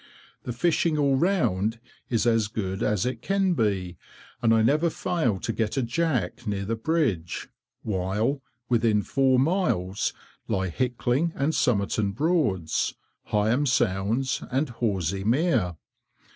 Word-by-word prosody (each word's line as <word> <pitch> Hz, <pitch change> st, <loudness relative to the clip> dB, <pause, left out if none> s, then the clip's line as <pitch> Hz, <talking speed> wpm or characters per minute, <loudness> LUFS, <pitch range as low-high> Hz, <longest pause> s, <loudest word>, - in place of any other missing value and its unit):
The 125 Hz, -, -3 dB
fishing 155 Hz, +5 st, +1 dB
all 140 Hz, -2 st, +3 dB
round 115 Hz, -, +1 dB, 0.3 s
is 115 Hz, -1 st, +1 dB
as 115 Hz, -2 st, +3 dB
good 100 Hz, -2 st, -4 dB
as 105 Hz, -3 st, +1 dB
it 125 Hz, -2 st, -3 dB
can 195 Hz, +3 st, +1 dB
be, 95 Hz, -, -1 dB, 0.4 s
and 115 Hz, -2 st, +3 dB
I 110 Hz, -1 st, +4 dB
never 155 Hz, +8 st, +3 dB
fail 155 Hz, -, -1 dB
to 115 Hz, -, -3 dB
get 110 Hz, +2 st, -1 dB
a 135 Hz, -, +2 dB
jack 125 Hz, -, -1 dB
near 100 Hz, -1 st, -2 dB
the 115 Hz, +3 st, -1 dB
bridge, 115 Hz, -, -1 dB, 0.3 s
while, 105 Hz, +7 st, -1 dB, 0.3 s
within 115 Hz, -3 st, +2 dB
four 135 Hz, +2 st, +2 dB
miles 130 Hz, -, +1 dB, 0.4 s
lie 95 Hz, 0 st, 0 dB
Hickling 125 Hz, -, 0 dB
and 140 Hz, +4 st, 0 dB
Somerton 100 Hz, -5 st, +1 dB
Broads, 125 Hz, -, 0 dB, 0.3 s
Heigham 110 Hz, +7 st, +1 dB
Sounds, 115 Hz, +3 st, +1 dB
and 135 Hz, +3 st, 0 dB
Horsey 100 Hz, -6 st, -1 dB
Mere. 115 Hz, -, +1 dB
115 Hz, 130 wpm, -26 LUFS, 100-140 Hz, 0.4 s, I